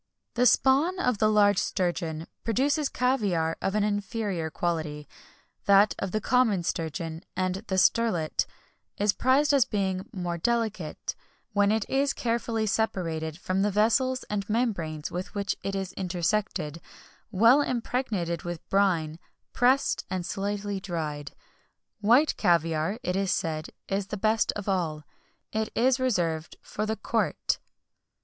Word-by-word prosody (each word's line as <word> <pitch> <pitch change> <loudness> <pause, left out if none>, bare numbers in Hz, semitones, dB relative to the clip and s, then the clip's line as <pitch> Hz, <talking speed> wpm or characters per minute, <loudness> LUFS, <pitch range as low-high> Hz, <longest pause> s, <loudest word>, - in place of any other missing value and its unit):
The 250 +1 +4
spawn 285 +11 +4
of 250 - 0
the 215 - +4
large 205 -2 +4
sturgeon 170 -4 -2 0.2
produces 280 +6 +1
caviar 200 -11 +1
of 195 - -1
an 210 - +2
inferior 205 -4 -2
quality; 155 -3 -3 0.6
that 200 +1 +6
of 195 - -3
the 215 - 0
common 225 -6 +2
sturgeon, 165 0 -3
and 185 0 0
the 190 - -1
sterlet, 185 -6 +2 0.5
is 205 0 +2
prized 280 +4 +3
as 270 -4 +5
being 190 -5 -2
more 175 -2 -3
delicate, 215 -6 -1 0.4
when 205 0 +3
it 220 -1 0
is 275 +1 +1
carefully 230 -1 -1
separated 165 -7 -1
from 185 +1 -1
the 205 - +2
vessels 235 +6 +2
and 205 -1 -4
membranes 185 -10 -1
with 180 +4 -5
which 200 0 -1
it 195 - -3
is 190 -1 -3
intersected, 175 -3 -2 0.5
well 230 +7 +5
impregnated 230 -9 -2
with 175 -2 -6
brine, 170 -5 +1 0.3
pressed, 255 +3 +2
and 185 -2 -2
slightly 200 +1 -3
dried. 155 -6 -4 0.6
White 240 +9 +4
caviar, 165 +2 +1
it 180 - -1
is 195 0 0
said, 155 -3 -1 0.2
is 195 0 -1
the 210 - -4
best 220 +2 +2
of 205 -1 -6
all. 165 -6 -1 0.5
It 220 0 -1
is 255 +2 +3
reserved 170 -11 0
for 215 +1 -3
the 220 - 0
court. - - -1
200 Hz, 140 wpm, -27 LUFS, 170-225 Hz, 0.6 s, that